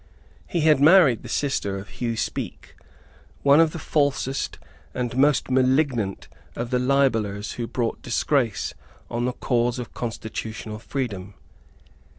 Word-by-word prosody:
He 170 - -1
had 155 -3 +5
married 155 - +6
the - - -10
sister 100 -9 -1
of 95 +1 -8
Hugh 115 -2 -3
Speke, - - -4 0.7
one 140 +2 +6
of 165 -1 +5
the 170 - -6
falsest 140 -3 -1 0.4
and 120 -1 -2
most 140 -1 +3
malignant 130 -5 +1 0.3
of 120 +1 -4
the 125 - +2
libellers 115 -6 +1
who 120 -1 -4
brought 120 -2 -2
disgrace 120 -5 0 0.4
on 120 +1 -1
the 125 - -1
cause 120 -1 0
of 125 -2 -6
constitutional 110 -2 -5
freedom. 105 -7 -4
125 Hz, 135 wpm, -24 LUFS, 115-140 Hz, 0.7 s, married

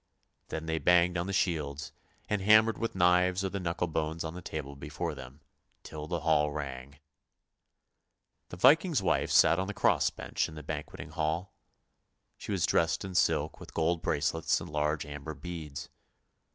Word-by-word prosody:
" - - -47
Then 80 0 -4
they 80 0 -1
banged 90 +3 +4
on 85 +1 -1
the - - -2
shields, 75 -6 -1 0.4
and 105 -2 -1
hammered 110 +3 +5
with 115 -3 -2
knives 90 +1 +3
or - - 0
the 100 - -4
knuckle 85 -1 -1
bones 80 0 -2
on 80 0 -5
the 90 - -8
table 75 -4 -6
before 70 +1 -4
them, 65 +1 -11 0.4
till 75 -1 -7
the 85 -1 -2
hall 75 -1 +2
rang. 70 -2 -6 1.5
The 90 - -8
Viking's 155 - +4
wife - - +1
sat 85 - +5
on 95 - -1
the 105 - -5
cross - - +3
bench - - -3
in 80 - -11
the 75 - -8
banqueting 75 +1 -6
hall. 80 +4 -2 0.9
She - - -6
was 95 -4 +1
dressed 85 +3 +1
in 95 - -6
silk 90 - +1
with - - -12
gold 85 +1 +1
bracelets 80 +1 0
and - - -9
large 75 +1 0
amber 75 +1 -7
beads. 80 -4 -7
80 Hz, 175 wpm, -30 LUFS, 75-90 Hz, 1.5 s, hammered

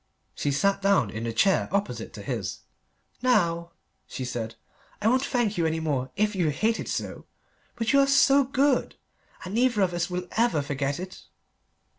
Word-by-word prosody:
She 145 - -2
sat 195 +8 +1
down 195 - +3
in 110 +2 -5
the 115 - -1
chair 190 - +2
opposite 200 +1 -2
to - - -8
his. - - -4 0.6
"Now," 170 -9 +1 0.3
she 130 - -5
said, 115 -2 -4 0.4
"I 210 - 0
won't 255 +3 +3
thank 235 -8 0
you 165 - +2
any 160 0 -1
more, 140 -5 -1
if 210 +1 +1
you 175 -4 +1
hate 220 +10 0
it - - -5
so; - - -4 0.5
but 230 0 0
you 280 - +6
are 275 0 +5
good, 270 0 +1 0.5
and 185 - -6
neither 240 -2 +2
of 180 -2 0
us 175 0 -1
will 180 0 -4
ever 225 -10 +2
forget 140 +1 -2
it." 185 +1 -8
190 Hz, 175 wpm, -26 LUFS, 150-230 Hz, 0.6 s, you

